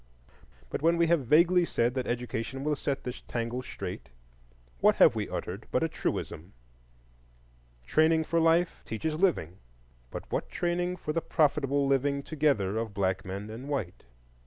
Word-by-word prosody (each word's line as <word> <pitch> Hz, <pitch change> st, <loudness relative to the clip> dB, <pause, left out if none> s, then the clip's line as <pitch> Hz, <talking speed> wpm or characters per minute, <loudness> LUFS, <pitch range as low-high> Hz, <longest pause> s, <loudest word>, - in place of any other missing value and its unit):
But -, -, -3 dB
when 165 Hz, +2 st, +3 dB
we 170 Hz, -, +4 dB
have 165 Hz, -6 st, +2 dB
vaguely 170 Hz, +5 st, +5 dB
said 120 Hz, -7 st, +1 dB
that 130 Hz, -1 st, -2 dB
Education 120 Hz, +1 st, -3 dB
will 150 Hz, 0 st, +1 dB
set 140 Hz, 0 st, -3 dB
this 125 Hz, -, -6 dB
tangle 120 Hz, +1 st, -3 dB
straight, 70 Hz, -, -7 dB, 0.7 s
what -, -, +5 dB
have -, -, +6 dB
we -, -, -3 dB
uttered -, -, -5 dB
but -, -, +1 dB
a -, -, +2 dB
truism? 85 Hz, +5 st, -4 dB, 1.3 s
Training 160 Hz, -, +3 dB
for 165 Hz, +1 st, 0 dB
life 165 Hz, +2 st, +2 dB
teaches 155 Hz, +8 st, -3 dB
living; 155 Hz, -, 0 dB, 0.5 s
but -, -, -6 dB
what -, -, -2 dB
training 175 Hz, 0 st, -1 dB
for 155 Hz, -2 st, -4 dB
the 165 Hz, -, 0 dB
profitable 145 Hz, -3 st, +2 dB
living 140 Hz, +1 st, +1 dB
together 140 Hz, -11 st, +1 dB
of 110 Hz, -2 st, -3 dB
black 95 Hz, -1 st, 0 dB
men 100 Hz, +2 st, -6 dB
and 125 Hz, +6 st, -8 dB
white? 110 Hz, -, -3 dB
140 Hz, 160 wpm, -29 LUFS, 115-160 Hz, 1.3 s, have